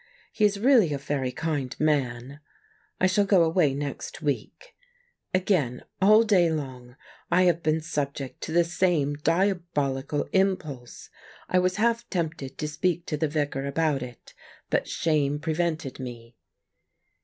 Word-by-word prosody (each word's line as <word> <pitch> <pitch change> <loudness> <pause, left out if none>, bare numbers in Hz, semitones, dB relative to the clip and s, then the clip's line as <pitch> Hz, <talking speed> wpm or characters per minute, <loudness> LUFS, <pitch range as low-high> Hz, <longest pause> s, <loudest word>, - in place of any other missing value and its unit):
He 215 - +2
is 205 -1 +1
really 230 - +5
a - - -1
very 135 -2 -2
kind 145 -2 -3
man. 140 -3 0 0.6
I - - +3
shall 185 +2 +3
go 195 -3 +4
away 160 -4 +2
next 145 0 -5
week. 150 - -4 0.6
Again, 180 - 0 0.2
all 215 +3 +7
day 190 -6 +4
long, 130 -5 -5 0.3
I 180 +1 +4
have 170 -2 +3
been 155 0 +1
subject 140 -4 -4
to - - -5
the 170 +1 +4
same 170 -4 +1
diabolical 150 -4 0
impulse. 160 -10 -1 0.4
I 185 - +3
was 185 0 +1
half 230 +2 0
tempted 160 -7 -3
to 150 - -3
speak 170 +3 -1
to 155 - -2
the 160 +1 +1
Vicar 145 -2 -2
about 145 -1 0
it, 125 -1 -10 0.4
but - - +1
shame 145 -3 0
prevented 160 -2 -2
me. 120 -2 -8
155 Hz, 145 wpm, -26 LUFS, 140-180 Hz, 0.6 s, all